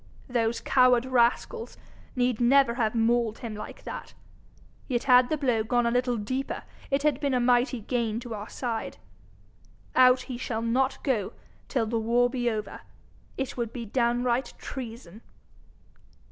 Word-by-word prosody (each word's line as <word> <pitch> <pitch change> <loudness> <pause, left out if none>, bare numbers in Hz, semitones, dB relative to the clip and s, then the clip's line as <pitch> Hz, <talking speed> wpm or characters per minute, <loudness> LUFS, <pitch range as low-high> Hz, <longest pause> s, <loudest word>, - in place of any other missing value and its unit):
Those 235 -2 0
coward 250 -2 +4
rascals 260 - 0 0.4
need 245 -2 +1
never 260 0 +5
have 235 -2 0
mauled 230 -1 +2
him 230 -4 -6
like 210 - -8
that. - - -8 0.7
Yet 245 -3 -1
had 250 -1 +5
the 310 - 0
blow 250 -6 +1
gone 240 +2 +1
a 235 - +2
little 245 0 +1
deeper 255 +6 -3 0.3
it 275 +1 0
had 295 -3 +2
been 280 -3 0
a - - +2
mighty 245 0 +2
gain 230 -1 -1
to 240 -1 -7
our 210 0 -6
side. 235 -3 -4 1.0
Out 255 0 +6
he 250 -2 -7
shall 225 -3 -3
not 260 +4 0
go 230 -9 0 0.3
till 245 -5 0
the 225 +1 -1
war 240 +2 +2
be 245 -2 0
over! 215 -2 -5 0.6
It 265 -1 -3
would 235 -2 -2
be 235 -1 -6
downright 240 +2 0
treason.' 225 -6 -8
245 Hz, 155 wpm, -27 LUFS, 230-255 Hz, 1.0 s, Out